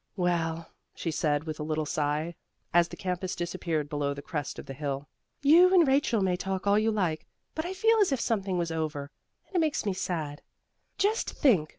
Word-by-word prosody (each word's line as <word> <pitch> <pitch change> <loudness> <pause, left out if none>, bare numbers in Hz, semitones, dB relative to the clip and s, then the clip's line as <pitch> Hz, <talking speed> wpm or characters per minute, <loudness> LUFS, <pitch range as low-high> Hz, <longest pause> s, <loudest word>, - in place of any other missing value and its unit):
"Well," 170 -3 -1 0.2
she 165 - -3
said 150 -1 +1
with 155 -1 -5
a - - -2
little 155 0 -1
sigh, 150 +3 -1 0.4
as 175 0 +5
the - - -10
campus 180 -1 -2
disappeared 170 -3 -2
below 145 -1 -1
the 140 - -8
crest 150 -2 -4
of - - -7
the 135 - -7
hill, 140 0 -4 0.4
"you 340 +6 +7
and 350 -5 +6
Rachel 265 -5 +3
may 185 -2 +2
talk 190 +1 -3
all 200 +1 +4
you 220 +1 +2
like, 180 -8 -1 0.3
but 315 +2 -3
I 375 - -4
feel 445 +3 +4
as 400 -7 +4
if 270 - +1
something 195 -6 0
was 170 -1 -1
over, 155 -3 -3 0.3
and 390 - -17
it - - +4
makes 310 -7 +1
me 200 - +1
sad. 160 -6 -3 0.6
Just 430 +3 +1
think! 190 - +3
175 Hz, 205 wpm, -29 LUFS, 155-225 Hz, 0.6 s, you